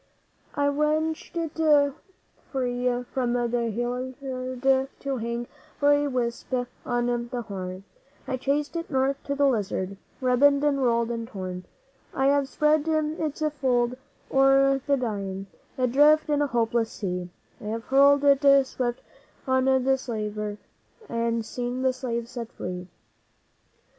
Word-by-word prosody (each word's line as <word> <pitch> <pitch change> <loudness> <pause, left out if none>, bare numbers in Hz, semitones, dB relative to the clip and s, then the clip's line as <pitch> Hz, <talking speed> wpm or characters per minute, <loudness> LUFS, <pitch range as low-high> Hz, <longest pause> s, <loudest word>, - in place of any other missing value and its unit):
'I 285 - 0
have 285 0 +1
wrenched 310 +2 0
it 305 -3 +3 0.6
free 250 -2 -1
from 245 -2 0
the 240 -1 0
halliard 255 +2 -1
to 275 -2 -2
hang 235 +1 -3 0.3
for 285 0 +4
a 290 0 +2
wisp 245 -3 -3 0.4
on 240 -1 0
the 245 -2 -3
Horn; 185 -2 -6 0.4
I - - -4
have 260 - -1
chased 285 +4 -1
it 335 0 -4
north 270 0 0
to 280 - -2
the 285 0 +3
Lizard 200 -6 -1 0.2
ribboned 280 +3 +4
and 285 -2 +2
rolled 235 -2 +2
and 230 -1 -4
torn; 185 -5 -6 0.5
I 265 - +1
have 280 -1 +2
spread 300 +1 +2
its 310 -1 -1 0.2
fold 245 -2 +2 0.4
o'er 270 0 +4
the 280 -1 +3
dying, 200 -5 -3 0.3
adrift 290 +5 +4
in 295 0 +2
a 290 - +2
hopeless 230 -2 0
sea; 180 -3 -4 0.3
I - - -11
have 225 +2 -3
hurled 280 +2 +5
it 280 0 +4 0.2
swift 245 -2 -3 0.4
on 260 -1 +2
the 265 0 +3
slaver, 210 -3 -4 0.5
and 230 -1 -1
seen 245 +2 -3
the 260 -1 +3
slave 235 -2 -3
set 235 -1 -7
free. 180 0 -6
255 Hz, 140 wpm, -26 LUFS, 235-280 Hz, 0.6 s, hurled